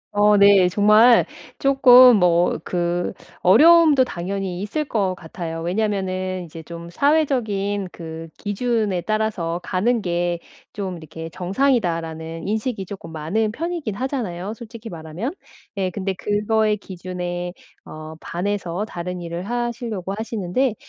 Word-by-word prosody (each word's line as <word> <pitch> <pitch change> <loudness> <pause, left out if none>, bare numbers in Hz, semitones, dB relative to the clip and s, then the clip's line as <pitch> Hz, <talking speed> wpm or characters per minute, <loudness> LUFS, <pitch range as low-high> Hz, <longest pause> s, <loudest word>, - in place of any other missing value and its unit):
어 210 0 +5
네, 200 -2 +6
정말 215 +5 +6 0.3
쪼끔 255 -2 +7
뭐 175 -2 +3
그 175 0 -1 0.3
어려움도 300 - +6
당연히 185 -2 -4
있을 300 +10 -2
것 195 -8 -1
같아요. 165 -1 -6
왜냐하면은 185 -1 -2
이제 165 0 -10
좀 170 +1 -9
'사회적인 215 - 0
그 165 -1 -8
기준에 210 -3 -1
따라서 205 -4 -1
가는 225 +5 0
게 175 -1 -1 0.3
좀 190 -4 -4
이렇게 160 0 -8
정상이다.'라는 170 - -1
인식이 215 -1 -2
조금 185 -3 -9
많은 175 +8 -1
편이긴 325 - -4
하잖아요, 215 -7 -3
솔직히 230 -1 -10
말하면. 170 - -5 0.4
예. 190 -1 0
근데 190 +1 -3
그거의 210 +2 +1
기준에 180 -2 -5 0.3
어 155 0 -9
반해서 185 +1 -3
다른 180 -3 -5
일을 170 +1 -5
하시려고 235 -5 -3
하시는데 220 +2 -1
195 Hz, 280 characters per minute, -22 LUFS, 175-220 Hz, 0.4 s, 쪼끔